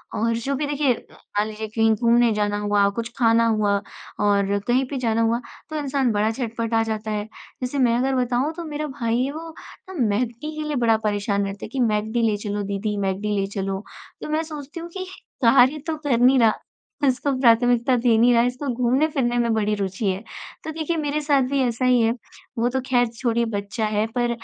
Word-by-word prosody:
और 230 +1 +1
जो 275 +4 -2
भी 295 +2 -1
देखिए 285 -3 +2 0.2
मान 205 +1 -3
लीजिए 220 0 -5
कहीं 225 +1 +2
घूमने 235 0 +3
जाना 205 -1 0
हुआ, 205 -1 +2
कुछ 230 +3 -4
खाना 230 -1 +4
हुआ 210 -2 +2 0.4
और 200 -1 +2
कहीं 255 +2 +2
पे 280 - -3
जाना 230 -3 +1
हुआ 230 +1 +1 0.3
तो 310 - -6
इंसान 275 -3 0
बड़ा 210 +1 +1
झटपटा 230 -1 -1
जाता 220 -1 -3
है। 210 -1 -2 0.4
जैसे 250 +3 -3
मैं 240 -2 +3
अगर 265 +2 +1
बताऊँ 250 +5 0
तो 340 - -6
मेरा 305 -1 -4
भाई 230 0 +1
है 275 - -2
वो 325 +2 -7 0.4
ना - - -7
मैक 210 +4 +1
डी 300 +6 -7
के 305 0 -3
लिए 300 - -2
बड़ा 230 -3 +3
परेशान 205 -1 -1
रहता 195 +1 -6
है, - - -7
कि, 265 - -4
"मैक 215 -2 +1
डी 240 +1 +1
ले 210 - 0
चलो 205 0 -3
दीदी, 200 +1 -2
मैक 195 -1 -1
डी 210 0 -1
ले 195 - -1
चलो।" 195 0 -3 0.4
तो - - -6
मैं 310 +1 0
सोचती 300 0 -8
हूँ 340 +1 -7
कि 375 - -4 0.4
कार्य 260 +5 +5
तो 315 - -1
कर 290 -5 0
नहीं 255 +2 +5
रहा, 225 -2 +5 0.5
इसको 265 +2 +1
प्राथमिकता 245 0 +4
दे 235 -1 +3
नहीं 240 +2 +5
रहा 235 - +5
है, 240 - +2
इसको 255 +3 -4
घूमने 255 +5 +2
फिरने 240 -4 0
में 235 -1 +2
बड़ी 215 -1 +1
रुचि 195 +1 -3
है। 185 - -4 0.4
तो 315 - -4
देखिए 320 +1 -2
मेरे 300 0 -1
साथ 285 -2 +3
भी 280 -1 0
ऐसा 240 0 -1
ही 250 -1 +4
है। 225 0 +3 0.5
वो 235 +1 +2
तो 265 +1 -1
ख़ैर 245 -1 +3
छोड़िए 235 -1 0
बच्चा 205 +3 -2
है 215 0 0
पर 240 -1 +1
235 Hz, 220 wpm, -23 LUFS, 215-265 Hz, 0.5 s, कार्य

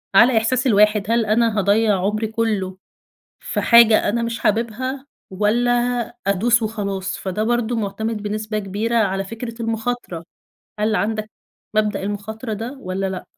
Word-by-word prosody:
على 235 +2 +6
إحساس 250 +4 +1
الواحد، 210 -1 +3
هل 230 -1 +2
أنا 220 0 +2
هاضيّع 205 0 +3
عمري 215 +3 0
كله 210 -4 -2 0.6
في - - -3
حاجة 235 -3 +6
أنا 235 +2 0
مش 230 0 -3
حاببها 240 +5 -1 0.3
والّا 215 +5 +1 0.6
أدوس 225 +4 +3
وخلاص؟ 200 -3 -3
فده 195 +3 -3
برضو 240 0 0
معتمد 215 +1 -3
بنسبة 215 +1 -3
كبيرة 210 +4 -2
على 195 -3 +1
فكرة 230 +3 -7
المخاطرة. 225 -6 -3 0.6
هل 215 0 +1
عندك 215 0 -2 0.5
مبدأ 210 -2 +1
المخاطرة 215 +3 -5
ده 225 +5 -4
والَّا 190 0 -3
لأ؟ 185 - -5
215 Hz, 140 wpm, -21 LUFS, 205-230 Hz, 0.6 s, على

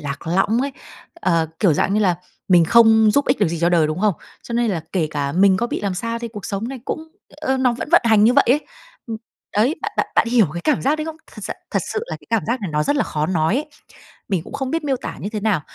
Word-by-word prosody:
lạc 140 +1 -6
lõng 195 +7 +2
ấy, 275 +1 -2 0.5
ờ, 165 - +2
kiểu 190 -6 +4
dạng 195 +6 +1
như 215 - +2
là, 185 -4 +2 0.3
mình 175 -3 +6
không 220 +3 +6
giúp 285 +6 +2
ích 255 - +2
được 205 - +2
gì 170 +1 -3
cho 170 - +3
đời, 170 -3 +3
đúng 155 +3 -3
không? 210 -3 +2 0.3
Cho - - -8
nên 235 -1 +1
là 170 -5 -2
kể 170 -5 +1
cả 140 -1 -2
mình 190 +2 +4
có 235 - 0
bị - - -4
làm 200 -2 -2
sao 230 +4 -3
thì 235 0 -5
cuộc 210 -3 -9
sống 205 +3 -3
này 265 -1 -7
cũng, 320 0 -5 0.3
ơ, 265 -3 -1
nó 255 -2 +2
vẫn 240 - -5
vận 345 - +7
hành 220 -2 +5
như 235 - +5
vậy 280 - +5
ấy, 280 +5 +2 0.4
ừm, 225 - -4 0.4
đấy, 240 +9 +3
bạn 430 -1 -3
bạn - - +1
bạn 230 - +3
hiểu 235 -4 +4
cái 170 - -4
cảm 300 - +1
giác 285 +4 +2
đấy 310 - -2
không? 320 0 -6 0.2
Thật - - -10
s - - -5 0.2
thật - - 0
sự 430 - -1
là - - -5
cái - - -21
cảm 225 -4 +2
giác 235 +3 -1
này 195 -5 -4
nó 150 0 +1
rất 285 - 0
là 285 - +2
khó 150 0 -2
nói 165 +1 +1
ấy, 300 - -2 0.6
mình 190 -6 0
cũng - - -12
không 265 -2 -3
biết 325 0 -2
miêu 275 -2 +1
tả - - -7
như 200 - -4
thế 215 - -3
nào. 205 -6 +1
220 Hz, 290 wpm, -20 LUFS, 180-255 Hz, 0.6 s, vận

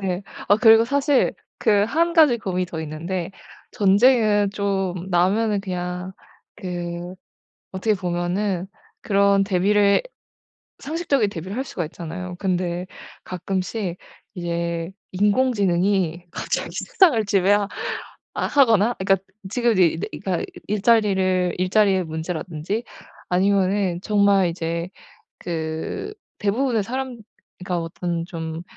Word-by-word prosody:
네. 190 -1 -2 0.3
어 205 - +6
그리고 225 0 +7
사실 280 +1 +2 0.2
그 205 -2 +3
1 335 +9 +1
가지 300 -8 +5
고민이 185 -3 -2
더 160 -2 -6
있는데 165 +4 -4 0.4
전쟁은 205 0 +4
좀 195 -3 -2
나면은 200 +4 +2
그냥 180 -1 -4 0.4
그 175 -2 -5 0.6
어떻게 210 +3 +1
보면은 180 +1 -1 0.4
그런 200 -1 +3
대비를 200 +1 +3 0.8
상식적인 285 -7 0
대비를 185 +5 -6
할 265 - -1
수가 175 -10 -4
있잖아요. 175 +3 -7
근데 180 -2 -1 0.4
가끔씩 185 +1 -3 0.4
이제 170 -1 -3 0.2
인공지능이 195 -5 +1
갑자기 - - -3
세상을 295 - +3
지배하 200 +1 +3 0.7
아 - - -1
하거나 235 -5 +4
이 190 - -2
그니까 195 -1 +3 0.3
지금 240 +1 +2
이제 185 -4 +3
이 165 - 0
네 - - -3 0.2
그러니까 185 -3 -1 0.2
일자리를 195 -4 +2
일자리의 190 0 +3
문제라든지 160 +5 -4 0.4
아니면은 190 -1 +1
정말 200 -3 +3
이제 170 0 -3 0.5
그 160 - -4 0.6
대부분의 225 -4 +1
사람 255 +1 -4 0.4
그니까 180 -1 -2
어떤 165 0 -3
좀 165 -1 -5
190 Hz, 260 characters per minute, -22 LUFS, 175-210 Hz, 0.8 s, 그리고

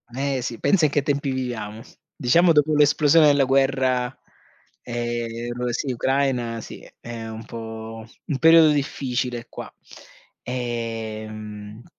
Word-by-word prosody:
Eh, 135 -1 -1
sì, 120 -1 -5
pensa 175 -6 +3
in 145 - +1
che 145 - +2
tempi 140 -1 -1
viviamo, 115 -5 -4 0.3
diciamo 170 +8 +4
dopo 155 0 +3
l'esplosione 150 +1 +5
della 145 -1 +4
guerra, 135 -1 +1 0.7
ehm 120 0 -4
sì, 130 +3 -2
Ucraina 125 -3 0
sì, - - -11
è 115 -1 -7
un 110 0 -8
po', 110 0 -8 0.2
un 140 - -2
periodo 165 -1 +7
difficile 125 -4 -2
qua. - - -8 0.7
Ehm, 110 -3 -5
125 Hz, 120 wpm, -23 LUFS, 115-140 Hz, 0.7 s, periodo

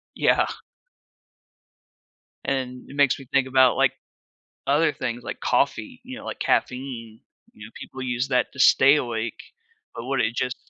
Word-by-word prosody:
Yeah. - - +3 2.0
And 130 -2 -3
it 140 - -10
makes 145 -2 +3
me 135 - -11
think 135 -1 +2
about, 130 -1 +4
like, - - +3 0.7
other 150 +2 +3
things, 120 -2 -4
like, - - -6
coffee, - - 0
you - - -8
know, - - -10
like, - - -6
caffeine. 125 -4 -2 0.3
You 105 - -12
know, 110 - -13
people 130 - -9
use 125 0 -1
that 125 -2 +1
to 140 - -12
stay 135 +2 +6
awake, 115 -4 -3 0.6
but 115 - -6
would 135 0 -1
it 115 +1 -1
just 125 0 -1
130 Hz, 155 wpm, -24 LUFS, 120-135 Hz, 2.0 s, stay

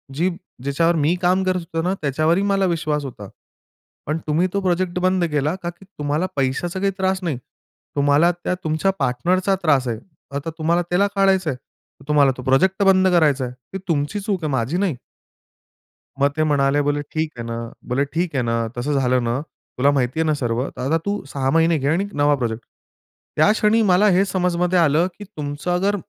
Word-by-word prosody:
जी 175 +6 +1 0.3
ज्याच्या 140 +5 +1
बरोबर 170 -2 +2
मी 155 +5 +2
काम 185 +1 +2
करत 185 -1 0
होतो 165 -1 -4
ना 185 +2 +1
त्याच्यावरही 155 +6 +1
मला 195 -1 +2
विश्वास 155 -4 -1
होता. 105 -6 -8 0.8
पण 150 +2 -1
तुम्ही 160 +4 +2
तो 200 - +1
प्रोजेक्ट 180 -1 0
बंद 185 0 +2
केला 150 +4 0
का 170 - -2
की 175 +3 -13
तुम्हाला 150 -3 -2
पैशाचा 140 +7 -1
काही 195 +1 +1
त्रास 190 -1 0
नाही. 155 -8 -1 0.6
तुम्हाला 145 +4 +4
त्या 175 +1 -3
तुमच्या 160 +5 +1
पार्टनरचा 180 +10 +1
त्रास 140 -6 +3
आहे. 115 -2 -2 0.4
आता 145 +3 -3
तुम्हाला 170 +2 +1
त्याला 195 +3 +3
काढायचं 190 -3 +3
आहे, 130 - -1
तर 135 +2 -26
तुम्हाला 145 -3 +4
तो 125 - -7
प्रोजेक्ट 190 +10 +2
बंद 190 -1 +5
करायचा 155 -7 +3
आहे. 125 - -7
ती 125 +9 -10
तुमची 150 +4 -1
चूक 195 -4 -2
आहे 150 - -1
माझी 130 +5 0
नाही." 190 -6 0 1.3
मग 140 - +5
ते 155 - +3
म्हणाले 145 -1 +2
बोलले, 145 0 0
"ठीक 155 0 -1
आहे 120 - -5
ना," 115 0 -4 0.3
बोलले 135 +3 +2
"ठीक 170 -2 -1
आहे 130 - +1
ना 115 0 0
तसं 145 +5 -1
झालं 125 -1 +2
ना 120 +2 -1 0.4
तुला 140 +3 +4
माहिती 130 +1 0
आहे 160 - +2
ना 155 - +3
सर्व? 120 +2 -1
तर - - -9
आता 145 +6 +1
तू 205 0 -2
6 135 -1 -2
महिने 165 +1 +3
घे 140 -1 -2
आणि 175 +6 +1
नवा 145 0 +3
प्रोजेक्ट." 120 -3 -3 0.7
त्या 155 +7 +5
क्षणी 220 +1 +3
मला 185 +4 +5
हे 195 - +5
समजमध्ये 180 -1 +1
आलं, 165 +2 +3
की 205 - -8
तुमचं 150 -4 -5
अगर 195 +3 +1
160 Hz, 200 wpm, -21 LUFS, 140-185 Hz, 1.3 s, बंद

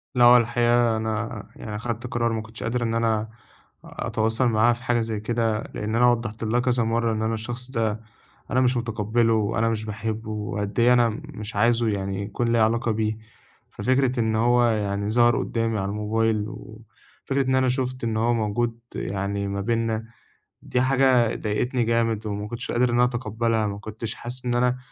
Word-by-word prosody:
لأ، 120 -1 +6
هو 120 +1 +9
الحقيقة، 120 0 +2
أنا 110 0 -3
يعني 105 -2 -7
أخدت 115 +2 -4
قرار، 120 -1 0
ما 110 - -2
كنتش 110 +1 -9
قادر 120 +2 -1
إن 115 -1 -1
أنا 110 -1 0 0.6
أتواصل 110 +3 -1
معاها 115 +1 +4
في 120 +1 -9
حاجة 120 0 +1
زي 110 -2 -2
كده، 110 0 0
لأن 105 +1 -2
أنا 125 +1 +5
وضَّحت 115 -2 -3
لها 115 +2 +1
كذا 125 -1 +1
مرَّة 115 +1 +1
إن 110 - -2
أنا 110 +1 0
الشخص 120 +3 -5
ده، 110 -3 -1 0.5
أنا 130 +3 +3
مش 125 -1 +2
مُتقبِّله، 115 0 +1
وأنا 110 +1 +1
مش 110 -1 -2
باحبه، 110 +1 -4
وقد 105 0 -3
إيه 120 +1 +6
أنا 120 -1 +4
مش 105 0 -8
عايزه 115 +2 +3
يعني، 100 -1 -2
يكون 115 +3 -2
ليها 115 -2 +4
علاقة 115 +1 +1
بيه. 110 0 -1 0.5
ففكرة 130 0 +1
إن 110 -1 +1
هو 120 +2 +3
يعني، 105 -3 0
ظهر 120 +1 +4
قُدَّامي 115 -1 -1
على 95 0 -2
الموبايل، 105 +1 0
وفكرة 115 +6 -6
إن 130 - +3
أنا 130 -1 +3
شُفت 130 0 -2
إن 115 -1 -1
هو 115 +2 +2
موجود 115 +1 -1 0.2
يعني، 100 +1 -2
ما 100 0 -2
بيننا، 115 0 -1 0.6
دي 125 - -1
حاجة 130 -3 +3
ضايقتني 120 +4 -1
جامد، 115 -2 0
وما 105 0 -3
كنتش 120 +3 -5
قادر 125 +1 +2
إن 120 - 0
أنا 120 - +4
أتقبَّلها. 115 -2 0
ما 100 0 -4
كنتش 110 +1 -6
حاسِس 125 +2 -5
إن 120 -1 0
أنا 125 +1 +2
115 Hz, 185 wpm, -24 LUFS, 110-120 Hz, 0.6 s, هو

